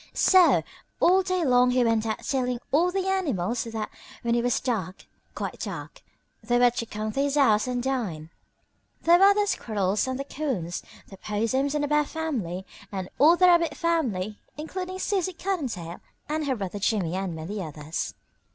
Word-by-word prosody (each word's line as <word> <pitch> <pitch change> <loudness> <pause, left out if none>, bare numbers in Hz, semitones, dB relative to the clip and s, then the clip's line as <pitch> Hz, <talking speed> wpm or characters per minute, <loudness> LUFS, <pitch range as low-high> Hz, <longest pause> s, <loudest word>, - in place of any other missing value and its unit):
So 370 -2 +5 0.4
all 375 +2 +5
day 370 -2 -1
long 250 -1 +4
he 250 0 +3
went 225 -1 +2
about 220 -1 -3
telling 250 -3 -1
all 340 +5 +3
the 380 0 -1
animals 245 - 0
that 225 -2 -4 0.4
when 235 0 +1
it 235 - +2
was 245 0 +1
dark 195 -8 -3 0.3
quite - - -5
dark - - -6 0.4
they 240 +2 +1
were 245 0 +5
to 230 -1 -4
come 215 0 -4
to 275 - -1
his 280 0 0
house 235 -6 +4
and 245 -1 -2
dine. 195 -13 -3 0.7
There 340 +1 +6
were 400 +1 +7
the 415 0 +2
Squirrels 210 - 0
and 260 0 -2
the - - -2
Coons, 255 - -3 0.3
the 195 - -11
Possums 230 +9 -1
and 295 - 0
the - - 0
Bear 300 0 +2
family 235 - -3 0.3
and 190 -2 -4
all 315 +5 +7
the 365 - +5
Rabbit 340 -2 +4
family, 230 - -1 0.2
including 365 +4 -5
Susie 375 -1 -1
Cottontail 260 - -4 0.3
and 305 0 -2
her 265 - +1
brother 200 -2 -5
Jimmie 195 -5 0
and 190 -3 -3
many 185 +6 -5
others. 155 -1 -5
245 Hz, 180 wpm, -26 LUFS, 205-320 Hz, 0.7 s, were